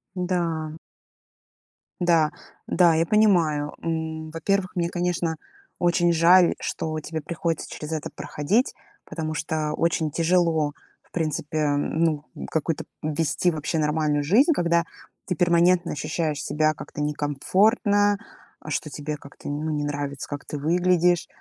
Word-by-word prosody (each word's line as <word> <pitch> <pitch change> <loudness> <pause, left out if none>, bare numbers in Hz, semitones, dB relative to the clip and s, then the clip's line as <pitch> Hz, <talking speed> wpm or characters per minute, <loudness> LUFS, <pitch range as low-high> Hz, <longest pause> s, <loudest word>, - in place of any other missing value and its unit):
Да. 165 -4 -2 1.2
Да. 165 -3 +3 0.4
Да, 170 -3 +4
я 165 +1 +2
понимаю. 165 -9 +3
М, 160 -1 -3
во-первых, 185 +3 -1
мне, 170 -1 +1
конечно, 175 -2 -1 0.4
очень 175 -1 +3
жаль, 170 +2 +6
что 155 0 -3
тебе 160 +1 -5
приходится 165 +1 -3
через 150 +1 -7
это 155 -2 -3
проходить. 205 - 0 0.3
Потому 155 -1 -4
что 155 0 -2
очень 160 -1 0
тяжело, 165 -2 +2 0.3
в - - -32
принципе, 155 -2 -1
ну, 155 0 0 0.3
какую-то 160 0 -1 0.2
вести 155 +3 +1
вообще 155 0 -2
нормальную 150 -1 +1
жизнь, 240 - +4
когда 170 - +2 0.4
ты 180 - -1
перманентно 175 0 +3
ощущаешь 155 +1 -2
себя 155 0 +1
как-то 150 - -8
некомфортно, 200 - +2 0.4
а, - - -11
что 150 +1 -2
тебе 150 +1 -4
как-то, 145 0 -11
ну, 150 +2 -2
не 150 -1 -1
нравится, 145 -1 -4
как 145 0 -6
ты 150 - -5
выглядишь. 175 +2 +2
160 Hz, 130 wpm, -24 LUFS, 150-175 Hz, 1.2 s, жаль